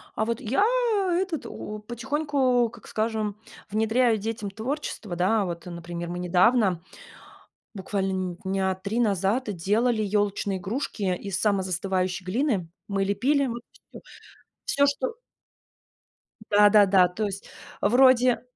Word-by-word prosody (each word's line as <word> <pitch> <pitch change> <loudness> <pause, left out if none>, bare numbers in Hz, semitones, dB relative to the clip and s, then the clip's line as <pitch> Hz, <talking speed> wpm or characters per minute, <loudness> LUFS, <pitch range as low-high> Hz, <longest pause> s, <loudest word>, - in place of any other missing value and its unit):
А 220 - 0
вот 230 +1 -2
я, 265 - +1 0.5
этот, 350 -3 -1 0.4
потихоньку, 260 -1 +1
как - - -15
скажем, 215 -2 -2 0.3
внедряю 220 +2 +2
детям 215 -1 -4
творчество, 225 - -4
да. 195 +4 +2
Вот, 170 -2 -6
э, - - -6
например, 170 0 -6
мы 175 +1 -4
недавно, 180 +1 +3 0.9
буквально 195 -1 -2
нь 185 -2 -3
дня 190 0 0
3 200 +5 -3
назад, 205 +2 +1
делали 215 +6 +1
ёлочные 205 -1 0
игрушки 200 -2 -2
из 195 +1 -4
самозастывающей 185 -2 -1
глины. 205 - 0 0.2
Мы 195 -1 0
лепили, 275 +8 +1
м, 245 - -3 0.4
всё - - -11 0.6
всё, 280 - +3
что 455 - -1 1.4
Да-да-да, 205 -3 +6
то 180 +5 -3
есть 200 0 -6 0.3
вроде 250 +2 +5
205 Hz, 120 wpm, -26 LUFS, 190-240 Hz, 1.4 s, Да-да-да